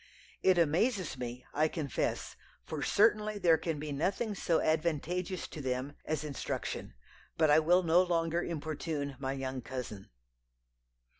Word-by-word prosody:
It 185 -1 +4
amazes 175 - +2
me, 125 0 -6
I 155 +2 +3
confess; 150 -5 -2 0.3
for - - -4
certainly, 215 0 +3
there 170 -5 +4
can 165 -3 -2
be 150 0 -5
nothing 190 +9 0
so 170 -4 +1
advantageous 170 +3 0
to 155 - -7
them 130 +1 -2
as 155 -1 -1
instruction. 140 - -4 0.4
But 155 -2 +4
I 150 - +7
will 175 +4 +4
no 170 +1 +5
longer 170 -1 +1
importune 155 -3 -3
my 135 -1 -2
young 135 -1 -4
cousin.' 120 -6 -6
155 Hz, 140 wpm, -32 LUFS, 140-175 Hz, 0.4 s, I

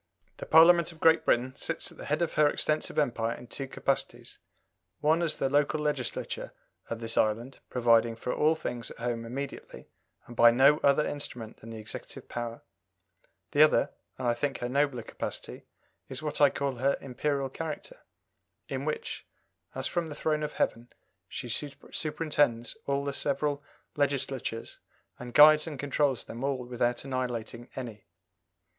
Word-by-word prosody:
The - - -7
Parliament 170 +1 +7
of 165 - -16
Great 160 0 +5
Britain 130 +2 +2
sits 165 - -3
at - - -17
the - - -7
head 150 +4 +1
of 170 - -2
her 150 -1 +5
extensive 155 +1 -1
Empire 115 -5 +1
in - - -11
two 135 +2 -5
capacities: - - -3 0.6
one 160 +3 +3
as 165 -3 +1
the 135 - 0
local 145 +2 +2
legislature 145 -5 -2 0.4
of 115 - -3
this 115 0 0
island, 115 +5 0
providing 115 -2 +3
for 120 +2 -3
all 155 +2 +3
things 120 -6 -4
at - - -11
home 115 -1 -3
immediately 135 +4 -7 0.4
and 120 - -11
by 120 0 +8
no 135 +5 +5
other 140 +2 +4
instrument 125 -6 -5
than 115 - -12
the 115 - -7
executive 110 -1 -8
power; 120 -1 -5 0.9
the 145 - +4
other, 155 - +5 0.3
and 130 - -2
I 120 - +4
think 135 +3 -2
her 120 - -3
nobler 140 -2 +1
capacity, - - -6 0.4
is 130 +3 -4
what 150 -1 -3
I 145 - +8
call 135 -2 -2
her 135 +3 +2
Imperial 135 +1 -2
character, 165 - -6 0.7
in - - -4
which, 465 0 -4 0.5
as - - -1
from 170 -2 -1
the 150 - -7
throne 155 0 0
of 150 - -3
heaven, 120 +1 -1 0.4
she - - -5
superintends 145 -2 -1
all 140 0 0
the 140 - -2
several 145 +1 -1 0.3
Legislatures, 135 -5 -2 0.4
and 120 -1 -8
guides 155 +1 +8
and 150 -3 -5
controls 140 -2 0
them 120 +3 -8
all 140 -1 +1
without 120 0 -1
annihilating 120 -3 -3
any. 115 -5 -7
135 Hz, 165 wpm, -29 LUFS, 120-150 Hz, 0.9 s, by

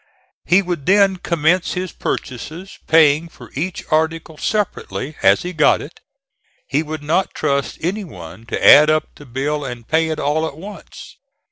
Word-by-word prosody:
He 185 +4 +4
would 175 -6 -4
then 195 -1 +4
commence 170 +1 +1
his 180 -1 -4
purchases, 160 +9 -6
paying 160 0 +4
for - - -15
each 175 +6 -4
article 160 +1 0
separately, 180 -6 -3
as - - +4
he 180 +1 -5
got 155 -3 +4
it. 150 - -11 0.7
He 145 +2 +1
would 155 -1 -6
not 165 +6 0
trust 140 -1 -1
any 195 +6 -2
one 95 - -11
to - - -2
add 150 +1 +9
up 155 0 0
the 145 - -15
bill 145 +4 -2
and 120 -3 -7
pay 160 0 +1
it 155 - -3
all 155 +3 0
at 145 - -9
once. 200 +5 -11
160 Hz, 165 wpm, -19 LUFS, 145-180 Hz, 0.7 s, add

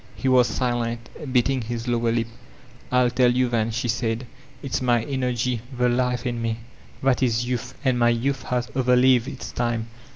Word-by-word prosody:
'* - - -25
He 135 - -3
was 125 -2 +5
silent, 120 -2 -2 0.2
biting 130 +1 +2
his 115 +1 -5
lower 120 -1 +1
lip. 115 0 +1 0.7
"I'll 125 -1 +3
tell 125 0 +4
you 125 0 +2
then/' 115 -2 +1
she 120 +2 -2
said. 115 +1 -1 0.4
"It's 135 - -2
my 120 -3 +2
energy, 125 -3 -1 0.2
the 125 0 +3
life 125 0 0
in 120 -1 -2
me. 115 -1 -1 0.5
That 135 -1 +2
is 120 -2 +1
youth, 125 0 -3
and 130 -2 +2
my 120 0 +4
youth 125 +3 0
has 125 -1 -1
overlived 125 -1 +4
its - - -7
time. 115 -1 -2
120 Hz, 185 wpm, -24 LUFS, 115-125 Hz, 0.7 s, was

